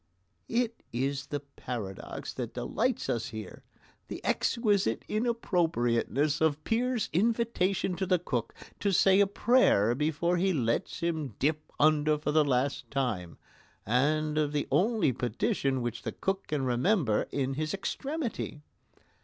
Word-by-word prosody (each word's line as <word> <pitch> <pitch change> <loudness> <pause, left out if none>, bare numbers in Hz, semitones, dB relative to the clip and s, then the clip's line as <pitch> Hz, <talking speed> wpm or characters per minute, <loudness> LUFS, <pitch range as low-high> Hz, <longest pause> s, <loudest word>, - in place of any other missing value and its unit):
It 230 -1 0
is 135 +3 -2
the 145 -2 -3
paradox 120 -8 -6
that - - -5
delights - - -1
us 115 -2 -1
here 110 -4 -8 0.4
the - - -6
exquisite 205 - +1
inappropriateness 160 - +1
of 155 -1 +2
Peer's 240 0 0
invitation 200 -2 +1
to 190 - -1
the 180 -1 +4
Cook 125 -9 -3 0.2
to 200 - +1
say 190 +1 +5
a 200 - +5
prayer 200 - +4
before 160 +6 0
he 190 +2 +2
lets 120 +3 -1
him 160 -8 -2
dip 155 +2 -1
under 150 0 +4
for 150 0 -2
the 155 0 +5
last 135 -1 0
time, 115 -11 -2 0.5
and 150 +6 +1
of 150 -1 0
the 145 - -1
only 215 - +3
petition 125 +2 -1
which 120 -1 -3
the - - -4
Cook 195 0 -2
can 145 -3 -1
remember 125 - +2
in 135 -1 -1
his 155 +2 -2
extremity. 240 - -4
150 Hz, 135 wpm, -29 LUFS, 130-195 Hz, 0.5 s, say